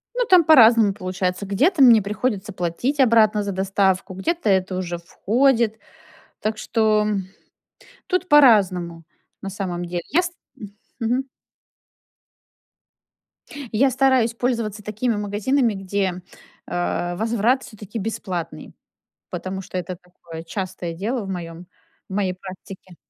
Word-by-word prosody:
Ну, - - +1
там 365 -5 +6
по-разному 230 -8 +6
получается. 185 0 -3
Где-то 280 - +2
мне 235 -4 +7
приходится 210 0 -3
платить 185 - -2
обратно 220 -4 +4
за 200 -1 -3
доставку, 190 0 0
где-то 330 - -2
это 190 -1 +1
уже 175 -2 -4
входит. 225 +5 +1 0.6
Так 215 +1 -2
что 215 -1 +1 1.0
тут 365 -1 -1
по-разному 185 - +4 0.4
на 195 - -6
самом 185 -3 -4
деле. 175 0 -4
Я 345 +4 +3
ст 355 -1 -4 0.7
мгм. 245 +3 0 2.5
Я 260 +5 +3
стараюсь 260 -3 +2
пользоваться 230 -4 -2
такими 215 +3 -2
магазинами, 215 +4 0
где, 190 -1 -2 0.4
э, 175 0 -2
возврат 230 +5 +1
всё-таки 215 0 -9
бесплатный, 185 -5 -5 0.6
потому 190 0 -5
что 185 - -7
это 180 0 -4
такое 170 -2 -12
частое 185 -2 -5
дело 220 +7 -3
в - - -7
моем 175 -1 -7 0.4
в - - -8
моей 190 -2 0
практике. 185 -1 -11
205 Hz, 120 wpm, -22 LUFS, 185-235 Hz, 2.5 s, мне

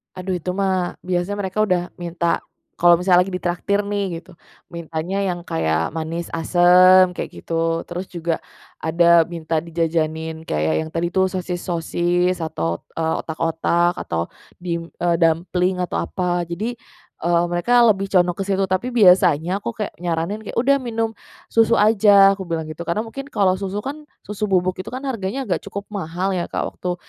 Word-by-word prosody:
Aduh 185 0 -3
itu 180 - -5
mah, 185 -2 0
biasa 180 +1 -1
mereka 200 0 -3
udah 180 -3 +1 0.2
minta 170 -1 -1 0.4
kalau 175 0 +6
misalnya 180 +1 +4
lagi 190 - -7
ditraktir 180 +3 -1
nih 195 -5 -2
gitu, 180 -2 -18 0.3
mintanya 170 +2 -4 0.2
yang 175 - -8
kayak 80 - -1
manis 165 +1 -4
asem 180 +2 +5
kayak 180 - -5
gitu. 165 0 -1
Terus 180 +2 -4
juga, 170 -2 -3 0.4
ada 170 +1 +4
minta 165 -1 -3
dijajanin 160 -1 -2
kayak 80 - 0
yang - - -8
tadi 170 +1 -1
tuh, 190 +2 +2
sosis-sosis 175 -1 -1
atau, 85 - -3
eee, 160 0 -1
otak-otak 165 +2 0
atau 85 0 -3 0.3
dim 170 -1 -4
eee, 175 -1 +2
dumpling 180 +2 +1
atau 180 - -2
apa. 175 -1 -1
Jadi, 210 +9 -4 0.5
eee, 170 0 +3
mereka 235 +8 +3
lebih 195 -1 0
condong 175 -2 +3
ke 195 - -3
situ, 195 -1 0
tapi 240 +7 -1
biasanya 180 -5 +4
aku 210 +3 -5
kayak 210 -2 -5
nyaranin 175 +5 -3
kayak, - - -7
"Udah 280 +2 +4
minum 230 -3 -3 0.3
susu 225 0 +3
aja," 200 -2 +6
aku 190 - -6
bilang 165 -2 -3
gitu. 155 +2 -7
Karena 170 +6 0
mungkin 235 +5 -7
kalau 190 -3 +2
susu 200 +1 -4
kan, 295 +5 -7 0.2
susu 210 0 -4
bubuk 185 -2 +1
itu 185 - -7
kan 255 - -4
harganya 250 -2 -3
agak - - -1
cukup 200 0 -7
mahal 185 -2 -3
ya 180 -3 -1
Kak - - -3 0.2
waktu 180 -1 -2
180 Hz, 165 wpm, -21 LUFS, 165-195 Hz, 0.5 s, kalau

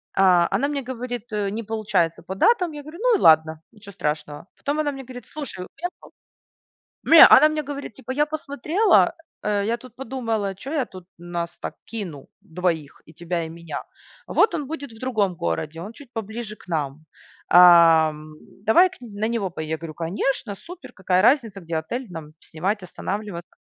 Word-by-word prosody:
А 180 -3 +5
она 280 - +1
мне 285 -1 -2
говорит, 245 -2 -6
э: 205 -2 0
"Не 220 +3 -3
получается 200 -7 -1
по 185 - -6
датам". 360 - +3
Я 295 - -7
говорю: 305 +3 -11
"Ну - - +4
и - - -7
ладно, 160 - +5
ничего 210 -2 -14
страшного". 150 0 -4
Потом 290 +2 -2
она 295 -1 0
мне 270 -1 -8
говорит: 250 -2 -10
"Слушай, 295 -10 -7
уехал". 355 +1 -8 0.9
Ме 330 -1 +9
она 305 - +8
мне 305 -1 -2
говорит 280 -3 -6
типа: 260 -1 -7
"Я 295 +3 +2
посмотрела, 310 - +2 0.3
э, 205 -1 0
я 230 +2 0
тут 250 -2 -15
подумала, 225 -6 -3
чё 270 +10 -7
я 285 -5 +1
тут 185 -2 -12
нас 175 0 -5
так - - -6
кину 180 -12 -7
двоих 165 -4 -3
и 160 - -16
тебя 170 -1 -3
и - - -7
меня. 165 -2 -7 0.4
Вот 425 - +3
он 295 -5 -4
будет 285 -4 -6
в 225 - -14
другом 215 -8 0
городе, 150 - -3
он 210 +5 -8
чуть 260 +1 -15
поближе 220 0 -5
к - - -19
нам. 155 -2 -3 0.4
Ам, 165 -3 +6 0.3
давай 350 +12 +6
к 375 - -15
нь 245 - -9
на 220 - +1
него 225 -5 -1
пое" 160 -2 -6
Я 160 +1 -2
говорю: 165 -1 -8
"Конечно, 200 - -2
супер, 350 - -12
какая 185 -1 +1
разница, 225 -4 +2
где 165 -1 -3
отель 235 +11 -4
нам 160 -3 -9
снимать, 190 +5 -3
останавливаться". 180 0 -5
210 Hz, 185 wpm, -23 LUFS, 170-265 Hz, 0.9 s, Ме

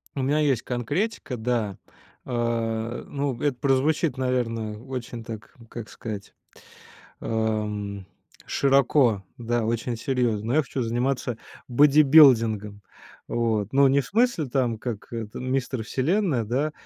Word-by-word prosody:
У 135 - -2
меня 140 +3 +1
есть 135 -6 +2
конкретика, 130 - -2
да. 110 -4 -1 0.5
А, 115 -2 -2
э, - - -11
ну, 140 -3 -3
это 145 -4 0
прозвучит, 140 +3 +1
наверное, 115 -4 -1
очень 120 -1 -6
так, 110 -1 -9
как 115 -2 -8
сказать, 105 -3 -7 0.9
ам, 105 -3 -2 0.4
широко, 135 -5 +3
да, 120 -1 -1
очень 115 +1 -1
серьезно. 120 -4 -1
Но 120 - 0
я 155 - +4
хочу 130 -1 -4
заниматься 120 +1 -1 0.3
бодибилдингом. 125 -7 +5 0.5
Вот, 110 -3 0
но 140 0 +6
не 140 +1 +3
в - - -6
смысле 230 - +1
там, 120 -4 0
как 120 +1 -6
это, 110 -2 -5
"Мистер 130 -2 -2
Вселенная", 150 - 0
да. 135 +8 -1
120 Hz, 130 wpm, -25 LUFS, 110-135 Hz, 0.9 s, но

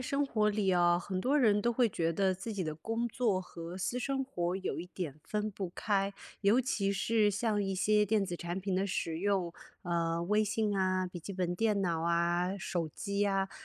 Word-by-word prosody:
生 275 +3 0
活 215 -6 +1
里 205 -2 +1
啊 175 -1 +4
很 185 +1 -3
多 275 +8 +2
人 210 -6 +4
都 235 - +2
会 240 -1 +2
觉 165 -3 0
得 190 +3 +1
自 200 +4 -6
己 190 -3 -2
的 155 -1 -3
工 225 +9 -2
作 230 -5 +1
和 175 -1 -7
私 215 +6 -2
生 270 +1 -1
活 180 -8 -2
有 190 -3 -3
一 175 - -7
点 165 -5 -6
分 210 0 -2
不 195 -2 -4
开， 200 -2 0 0.3
尤 210 +4 +4
其 215 -6 +1
是 210 +1 +2
像 210 0 0
一 195 -1 -1
些 210 +2 +3
电 210 0 +2
子 180 - -4
产 175 +1 -4
品 195 0 -2
的 190 +2 +1
使 165 -4 -2
用， 190 -2 0 0.3
呃， 170 -1 0
微 210 +5 +2
信 210 0 0
啊、 185 -1 +1
笔 180 -1 -7
记 195 +4 -7
本 180 -1 -1
电 210 0 +1
脑 170 -3 0
啊、 170 +2 +1
手 175 -4 -2
机 200 +6 -4
呀 195 -1 +1
195 Hz, 230 characters per minute, -32 LUFS, 175-210 Hz, 0.3 s, 啊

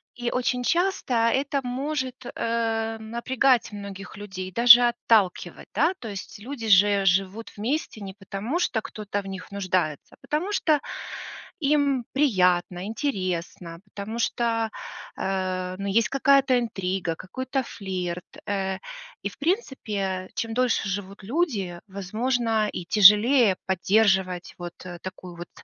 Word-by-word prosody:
И 240 -1 -2
очень 250 0 0
часто 350 -2 +1
это 265 +5 +2
может, 260 0 -3
э, 225 -1 -1
напрягать 235 +2 +1
многих 200 -1 -8
людей, 190 -2 -6
даже 240 +3 +8
отталкивать. 200 -7 +1
Да? 325 +5 +3
То 235 - -7
есть 200 0 -7
люди 235 +1 -6
же 200 0 +5
живут 195 +5 0
вместе 235 +1 -2
не 195 -1 -7
потому, 200 - -4
что 230 -10 0
кто-то 205 -1 -4
в - - -16
них 190 0 -7
нуждается, 185 -6 -2
а - - -47
потому 310 +8 -1
что 310 -7 +2 0.8
им 285 -4 +2
приятно, 180 -9 +2
интересно, 185 - -3
потому 205 +3 -6
что, 230 -1 0 0.5
э, 185 -1 -2
ну 200 - -3
есть 215 +3 +2
какая-то 275 -1 +4
интрига, 190 -6 -2
какой-то 260 - -3
флирт, 180 -5 -5 0.2
э. 190 -1 -1 0.4
И - - -1
в - - -16
принципе, 210 - -2
чем 225 0 -2
дольше 250 -4 +1
живут 195 +1 -5
люди, 210 - -1
возможно, 220 +3 0
и 180 - -6
тяжелее 210 +2 +7
поддерживать 190 -1 +2
вот, 175 -1 -7
э, 175 -1 -8
такую 185 -1 -8
вот 175 0 -8
210 Hz, 130 wpm, -25 LUFS, 190-250 Hz, 0.8 s, даже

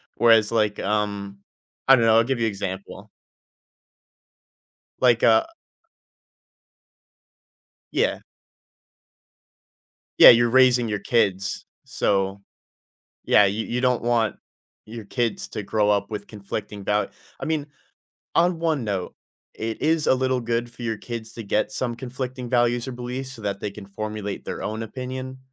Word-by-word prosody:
Whereas, 115 -2 +5
like, 105 -2 +1
um, 100 -1 -2 0.5
I 135 - +9
don't 115 - +2
know, 110 0 +5
I'll 115 - +5
give 130 -2 -1
you 115 - +1
example. 95 -2 -6 1.9
Like, 120 -2 +4
uh 110 -1 +5 2.5
Yeah. - - +1 2.0
Yeah, - - +12
you're 120 0 +4
raising 125 -2 +4
your 105 -1 -2
kids. 100 -5 0 0.2
So, 95 0 0 0.8
yeah, 100 - +5
you 105 +3 -1
you 125 - -2
don't 125 -2 +1
want 115 -3 +1 0.5
your 110 -1 -9
kids 120 0 -2
to 105 - -5
grow 105 +1 +1
up 100 0 +1
with 105 -1 -5
conflicting 105 0 -6
doubt 105 0 0 0.3
I - - -5
mean, 155 -2 -1 0.7
on 170 0 +3
one 160 -6 0
note, 100 -4 -3 0.4
it 110 0 -4
is 160 -1 +1
a - - +6
little 130 -1 0
good 120 +1 -1
for 120 +1 -12
your 110 -2 -2
kids 115 -2 -7
to 115 - -7
get 105 +2 0
some 120 -2 -2
conflicting 125 0 -6
values 120 0 +2
or - - -4
beliefs 125 +2 -5
so, 115 -4 -11
that 100 -1 -3
they 105 - -3
can 100 -1 -11
formulate 105 0 -5
their - - -5
own 110 +1 -3
opinion, 130 +3 -6
115 Hz, 140 wpm, -24 LUFS, 105-125 Hz, 2.5 s, Yeah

